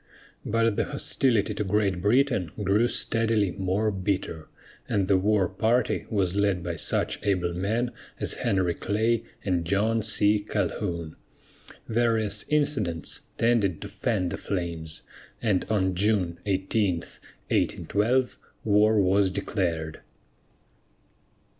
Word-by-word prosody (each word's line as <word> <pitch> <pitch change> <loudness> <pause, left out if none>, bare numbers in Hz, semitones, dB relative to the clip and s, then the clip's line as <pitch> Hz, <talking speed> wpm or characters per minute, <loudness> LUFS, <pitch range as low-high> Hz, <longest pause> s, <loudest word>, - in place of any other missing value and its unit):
But 115 -1 +1
the - - +1
hostility 115 -7 +1
to - - -2
Great 100 -2 0
Britain 105 - +2
grew 105 +5 +3
steadily 115 -5 +1
more 100 +3 0
bitter, 95 -5 -3 0.4
and 100 -2 +1
the 95 - +4
war 100 0 +2
party 115 +6 0
was 95 -5 0
led 100 -3 +1
by 85 -1 -3
such - - +1
able 90 -4 0
men 110 +7 -1 0.3
as - - 0
Henry 95 -3 +1
Clay 110 +5 0 0.2
and 90 -4 +1
John 105 +6 +1
C. 105 -1 +3
Calhoun. 85 -5 -3 0.7
Various 110 -3 +1
incidents 135 - 0 0.2
tended 115 -7 +2
to - - -5
fan 100 -7 -1
the - - -4
flames, 85 -4 -4 0.4
and 105 -6 +1
on 95 -4 +1
June 90 -3 0
18, 95 0 +1
1812, 125 +5 -1 0.2
war 105 +1 +4
was 95 0 +3
declared. 90 -5 -2
100 Hz, 115 wpm, -26 LUFS, 90-110 Hz, 0.7 s, the